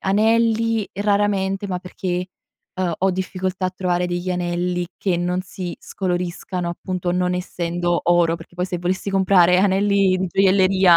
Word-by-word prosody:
anelli 225 +2 +2
raramente, 200 -1 0
ma 180 -2 -2
perché, 180 0 -4 0.5
uhm, 180 -2 -1
ho 190 +1 +2
difficoltà 185 0 -2
a - - -2
trovare 180 -1 -1
degli 175 +1 -3
anelli 175 0 -1
che 185 -3 0
non 180 +1 -1
si 185 -1 -6
scoloriscano, 180 -1 -3
appunto, 180 +1 -3
non 180 0 +1
essendo 175 -1 -1
oro, 170 -1 +3
perché 165 +1 -14
poi 180 - -1
se 180 -1 -3
volessi 185 +3 -2
comprare 185 -2 +4
anelli 195 0 +3
di 185 0 -1
gioielleria 190 -1 +5
185 Hz, 150 wpm, -21 LUFS, 175-195 Hz, 0.5 s, gioielleria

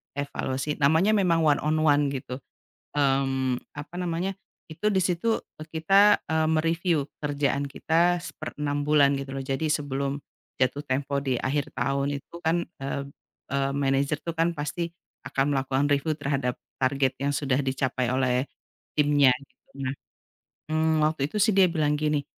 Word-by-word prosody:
evaluasi 140 0 -2
namanya 160 +9 +4
memang 175 -5 +3
one 150 -2 +4
on 155 +1 +1
one 145 0 +4
gitu, 130 -2 -5 0.6
mmm, 135 -2 +1 0.2
apa 150 +4 -8
namanya, 180 +2 -2 0.3
itu 160 +6 -5
di - - +3
situ, 185 +6 +1 0.2
eee, 155 - -8
kita, 195 +6 +5
eee, 160 0 +2
me-review 165 -1 +1 0.2
kerjaan 145 -1 0
kita 170 +5 +2
1/6 145 -2 -4
bulan, 145 -2 +5
gitu 135 0 -6
loh. 135 - -3
Jadi 135 +4 -2
sebelum 140 -2 -1 0.4
jatuh 130 +3 +1
tempo 140 +2 -1
di 130 -2 0
akhir 140 +1 -1
tahun 140 +3 0
itu - - -25
kan, 170 +1 +1 0.2
eee 140 0 -2 0.5
eee, 140 0 +1
manajer 140 +1 +1
tuh 170 -1 -4
kan 165 +1 +2
pasti 165 +3 -3 0.4
akan 140 +1 0
melakukan 135 +1 +1
review 145 +2 +1
terhadap 140 -3 -1 0.2
target 130 0 +1
yang 140 - +1
sudah 135 -2 +1
dicapai 130 -2 -1
oleh 130 0 +1 0.5
timnya, 145 -2 +5
gitu. 140 - -22 0.2
Nah, 130 - -1 0.8
mmm, 155 -1 +2
waktu 155 -3 +1
itu 210 - -7
sih 220 0 +4
dia 190 -1 +6
bilang 155 -3 +1
gini, 150 -2 0
145 Hz, 155 wpm, -26 LUFS, 135-160 Hz, 0.8 s, dia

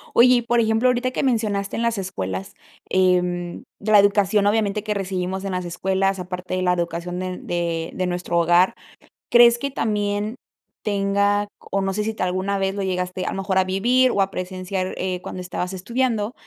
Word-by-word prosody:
Oye, 250 +1 +7
y 240 - +2
por 240 0 +1
ejemplo, 225 +2 +3
ahorita 250 +1 +1
que 255 - -2
mencionaste 215 -6 0
en - - -2
las 235 -1 0
escuelas, 95 - -4 0.3
em, 180 -1 +1 0.2
la 215 +1 +4
educación 200 0 +4
obviamente 210 -1 +1
que 215 -1 -1
recibimos 190 -1 -3
en 195 -1 -3
las 180 0 -2
escuelas, 190 +2 0
aparte 180 0 -5
de 185 - -1
la 180 -1 +2
educación 175 0 -3
de 185 - -3
n - - -7
de 170 -1 -2
de 185 - -1
nuestro 175 -1 -2
hogar, 175 +2 +4 0.6
¿crees 240 0 +7
que 280 +3 -3
también 210 -2 -1 0.5
tenga 200 0 +1
c? - - -23 0.2
o 195 - +1
no 195 0 -1
sé 210 +2 -1
si 220 +1 -2
te 215 - -3
alguna 185 +2 -1
vez 195 0 -1
lo 200 - -2
llegaste, 180 0 -2
a - - -1
lo - - -4
mejor, 190 0 -1
a 190 - +5
vivir 245 +8 +2
o 200 - +1
a 195 - +1
presenciar, 185 0 -4
eh, 185 -1 -2
cuando 185 - -7
estabas 180 0 -4
estudiando, 225 +3 -1
195 Hz, 200 wpm, -22 LUFS, 180-210 Hz, 0.6 s, Oye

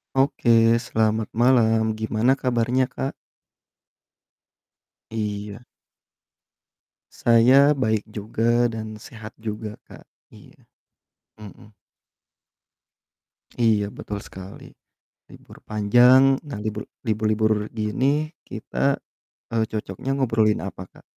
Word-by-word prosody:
Oke, 115 -4 +3
selamat 110 -2 0
malam, 110 -2 +3
gimana 110 +4 +1
kabarnya, 125 0 +1
Kak? 135 +1 -5 2.0
Iya. 105 0 -5 1.5
Saya 130 +5 +5
baik 110 -4 -1
juga 115 +3 0
dan 110 -1 -6
sehat 110 +1 -12
juga, 110 -1 -6
Kak, - - -14 0.3
iya, - - -17 0.8
mhm. 105 -1 -13 1.8
Iya, 110 -3 +1
betul 105 -1 -5
sekali. 95 +1 -11 0.7
Libur - - -15
panjang, 125 +6 +5
nah 140 -8 -6
libur 110 0 -4 0.2
libur-libur 110 0 +1 0.2
gini 135 +8 0 0.2
kita, - - -2 0.5
eee, 115 -1 +1
cocoknya 105 +3 -5
ngobrolin 115 -5 +1
apa, - - -7
Kak? - - -20
110 Hz, 90 wpm, -23 LUFS, 110-125 Hz, 2.0 s, Saya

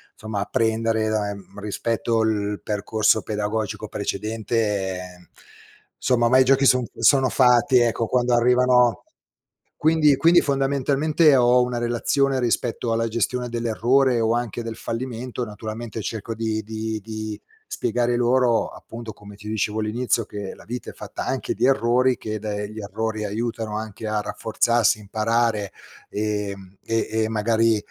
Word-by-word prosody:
insomma, 110 -2 -4
apprendere 110 0 0
da 105 -1 0
ehm, 100 0 -10
rispetto 115 +2 -1
il 105 -2 -1
percorso 105 +1 +1
pedagogico 105 0 -3
precedente, 105 -3 -2
ehm, 90 -1 -11 0.7
somma, 120 -2 +2
ormai 130 +2 +5
i - - +7
giochi 135 +1 +4
son 125 -1 +4
sono 135 -3 +4
fatti, 125 0 +4
ecco, 115 -1 +1
quando 125 +1 +1
arrivano 125 -2 +4 0.9
quindi 155 -3 +5
quindi 170 +5 +5
fondamentalmente 140 +2 +2
ho 125 0 +5
una 125 -1 -2
relazione 130 +3 +1
rispetto 120 -1 -1
alla 115 0 +1
gestione 120 +2 -1
dell'errore 120 +2 +2
o 115 0 +2
anche 120 -1 -2
del 115 -1 -6
fallimento 125 +1 -4
naturalmente 110 +1 -6
cerco 110 +1 -4
di 110 0 -2
di 110 0 -4
di 110 -1 -5 0.3
spiegare 120 +1 -1
loro, 120 -1 +2
appunto, 115 -1 -9
come 105 0 -14
ti 105 +1 -13
dicevo 110 0 -1
all'inizio, 115 +1 0
che 100 -2 -7
la - - -16
vita 120 0 -6
è - - -10
fatta - - -7
anche - - -2
di - - +1
errori, 125 -1 +3
che 110 0 -5
da 105 0 -4
gli 105 +1 -8
errori 110 +1 -3
aiutano 110 0 -3
anche 110 0 -6
a 105 0 0
rafforzarsi, 115 +1 +1
imparare, 110 0 0 0.4
ehm, 100 -2 -4
e 115 0 -1 0.2
e - - -1
magari, 110 +1 +2
115 Hz, 145 wpm, -23 LUFS, 110-125 Hz, 0.9 s, i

